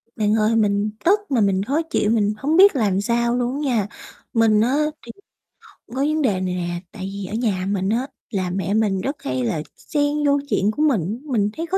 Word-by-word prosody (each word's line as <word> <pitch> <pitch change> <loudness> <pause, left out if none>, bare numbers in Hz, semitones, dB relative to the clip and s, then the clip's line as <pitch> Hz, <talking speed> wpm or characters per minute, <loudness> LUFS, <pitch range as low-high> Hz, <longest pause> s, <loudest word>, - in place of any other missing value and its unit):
Bạn 210 -1 +1
ơi, 220 +1 +2
mình 205 -1 +2 0.2
tức 400 +5 +5
mà 245 -4 +3
mình 195 -1 +2
khó 280 +9 0
chịu, 315 -10 0
mình 210 -2 +2
hổng 300 +7 0
biết 390 -2 +7
làm 200 -6 +1
sao 235 +2 +1
luôn 245 0 -1
á - - -3 0.2
nha. 205 -3 0 0.5
Mình 225 -2 +4
á 250 +5 +2 0.3
thì 235 - -8 0.6
có - - -23 0.2
vấn 305 +2 +1
đề 255 -7 +3
này 185 -1 -2
nè, 175 -1 -3
tại 190 -2 -6
vì 200 -1 -5
ở 190 - -7
nhà 215 -5 -1
mình 195 -1 0
á, 240 +5 0 0.2
là 185 -3 -1
mẹ 190 +1 -2
mình 205 -3 +1
rất 275 +7 -2
hay 130 -1 -2
là 120 +6 -1
x - - -22
xen 295 0 -1
vô 285 0 +3
chuyện 205 -3 +2
của 255 - -4
mình, 225 - +1
mình 210 -4 +2
thấy 330 - -2
khó 380 - 0
215 Hz, 230 wpm, -21 LUFS, 195-265 Hz, 0.6 s, biết